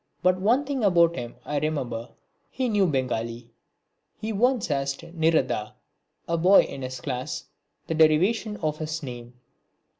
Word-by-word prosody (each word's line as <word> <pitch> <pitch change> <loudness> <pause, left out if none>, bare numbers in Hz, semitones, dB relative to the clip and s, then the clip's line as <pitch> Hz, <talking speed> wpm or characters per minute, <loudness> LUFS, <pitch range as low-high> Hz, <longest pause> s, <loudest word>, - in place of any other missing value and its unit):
But 185 0 +3
one 240 +8 +3
thing 270 -3 -2
about 170 -4 +4
him 120 -7 -6
I 145 -1 -1
remember. 130 -7 -3 0.4
He 255 -1 -2
knew 205 -3 +3
Bengali. 120 -4 -2 0.7
He 220 +1 -4
once 240 - +1
asked 140 -1 -1
Nirada, 160 -10 0 0.5
a 170 0 0
boy 185 +4 +7
in 135 - -7
his 130 0 -5
class, 125 -1 -4 0.4
the - - -2
derivation 185 +8 +3
of 155 -1 -1
his 155 +1 -4
name. 120 -2 -8
155 Hz, 145 wpm, -26 LUFS, 130-195 Hz, 0.7 s, boy